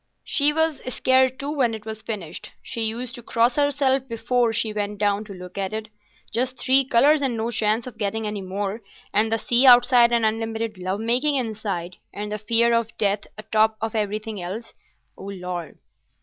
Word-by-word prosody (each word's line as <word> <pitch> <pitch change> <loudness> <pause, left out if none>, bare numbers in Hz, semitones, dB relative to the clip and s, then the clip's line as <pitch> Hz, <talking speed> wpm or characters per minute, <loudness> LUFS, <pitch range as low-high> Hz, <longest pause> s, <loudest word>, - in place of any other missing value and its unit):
"She 290 0 +4
was 320 -1 0
scared 260 +1 +2
too 280 +1 -3
when 250 -7 +1
it 220 0 -10
was 220 0 -6
finished. 195 -8 -6
She 230 -3 -3
used 235 +2 -3
to 240 - -6
cross 235 +1 +1
herself 275 -2 +1
before 235 0 0
she 220 -1 -1
went 205 0 -3
down 205 0 +1
to 205 - -9
look 180 +2 -9
at 195 +1 -2
it. 215 0 -5 0.4
Just 255 +2 -1
three 265 +1 +3
colours 280 +5 +4
and 255 -4 -1
no 225 +2 -2
chance 220 0 +1
of 255 - -10
getting 220 +1 -2
any 210 -1 -3
more, 195 +3 -4 0.3
and 220 +2 +2
the 225 - +3
sea 245 +4 +3
outside 245 -1 +7
and 235 -1 +2
unlimited 225 -1 -2
love 185 +2 -2
making 250 +6 +1
inside, 210 -8 -3
and 210 +1 -6
the 210 - -3
fear 235 +2 +4
of 230 -1 -1
death 205 -1 0
atop 215 +1 +1
of 225 -1 -3
everything 215 -1 -3
else, 195 +7 -6 0.5
O - - -9
Lord!" 180 -4 -6
225 Hz, 190 wpm, -23 LUFS, 210-245 Hz, 0.5 s, outside